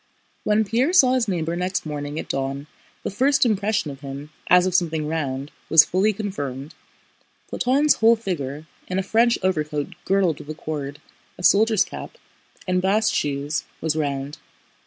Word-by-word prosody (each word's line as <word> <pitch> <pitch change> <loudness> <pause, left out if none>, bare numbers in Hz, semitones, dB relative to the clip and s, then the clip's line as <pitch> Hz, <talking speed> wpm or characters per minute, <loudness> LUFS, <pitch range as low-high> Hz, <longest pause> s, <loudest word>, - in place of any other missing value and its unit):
When 215 +1 +2
Pierre 245 - +1
saw 260 -9 +6
his 250 -3 +1
neighbor 170 -3 -1
next 180 +1 -2
morning 145 -1 -5
at - - -4
dawn 135 +1 -3 0.4
the - - -3
first 270 +7 +3
impression 205 -7 0
of 135 - -10
him, 140 +2 -8 0.2
as 180 0 +6
of 185 - -1
something 160 -4 +1
round, 140 -3 -3 0.2
was 160 -2 +8
fully 190 +4 +2
confirmed: 150 -9 -5 0.8
Platón's 280 +4 +2
whole 225 +1 +5
figure—in 165 -3 -5
a 190 - 0
French 230 +4 +3
overcoat 150 -5 -1
girdled 190 -5 +1
with 145 - -11
a 155 - -4
cord, 145 -2 -5 0.4
a 180 - -10
soldier's 215 +2 +4
cap, - - -9 0.5
and 180 0 +1
bast 210 +3 +2
shoes—was 150 +2 -2
round. 140 -1 -3
175 Hz, 155 wpm, -23 LUFS, 145-210 Hz, 0.8 s, was